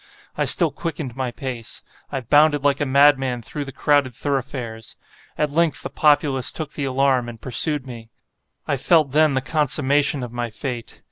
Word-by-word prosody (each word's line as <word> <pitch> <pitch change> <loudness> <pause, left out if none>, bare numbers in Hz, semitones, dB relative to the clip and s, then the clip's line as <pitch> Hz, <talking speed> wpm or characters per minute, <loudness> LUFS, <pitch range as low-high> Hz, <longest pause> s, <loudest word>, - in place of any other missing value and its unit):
I - - 0
still - - +3
quickened 150 -7 -5
my 130 -1 -2
pace. 120 -2 -6 0.3
I 135 - -3
bounded 145 +3 +3
like 145 0 +1
a 145 - 0
madman 135 -3 +3
through 145 +4 -5
the 135 - -8
crowded 140 -3 +1
thoroughfares. 125 -5 -4 0.4
At 150 -1 0
length, 165 +1 +1
the - - -5
populace 145 -4 +2
took 155 -3 -6
the 145 - -3
alarm, 130 -2 +1
and 115 -1 -10
pursued 135 +3 +1
me. 115 -3 -10 0.6
I 140 - 0
felt 155 0 +3
then 155 -1 +3
the 130 - +1
consummation 145 -1 +1
of 120 -1 -7
my 120 -1 -3
fate. 120 +1 -6
135 Hz, 175 wpm, -21 LUFS, 125-145 Hz, 0.6 s, still